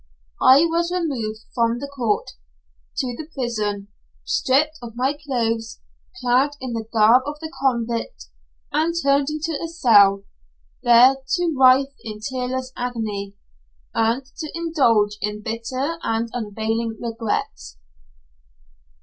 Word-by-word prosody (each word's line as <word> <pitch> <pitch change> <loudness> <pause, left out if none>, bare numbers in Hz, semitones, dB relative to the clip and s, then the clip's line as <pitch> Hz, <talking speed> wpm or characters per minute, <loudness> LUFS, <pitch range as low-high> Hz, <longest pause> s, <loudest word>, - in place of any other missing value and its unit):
I 275 +5 +7
was 340 +1 0
removed 255 -12 -2
from 230 -1 +1
the 280 +3 -5
court 245 -7 -1 0.7
to 250 -2 -2
the 305 +4 -8
prison, 210 -6 -2 0.3
stripped 300 +4 +1
of 235 -2 -9
my 260 +3 +1
clothes, 230 -6 -2 0.4
clad 255 +4 +2
in 255 -2 -5
the 225 -1 -4
garb 225 +3 +5
of 295 0 -5
the 315 +1 -7
convict, 235 - -1 0.5
and 335 +2 +1
turned 280 -1 +2
into 310 0 -3
a - - -2
cell, 205 - +4 0.6
there 245 +3 +6 0.2
to 350 -3 0
writhe 265 +1 +5
in 215 -1 -7
tearless 255 +1 -3
agony, 215 -5 -4 0.6
and 230 +4 +1
to 310 -2 -5
indulge 235 -12 +2
in 210 0 -3
bitter 255 +9 -3
and 225 +1 -1
unavailing 225 0 -2
regrets. 225 - -4
245 Hz, 125 wpm, -22 LUFS, 225-280 Hz, 0.7 s, I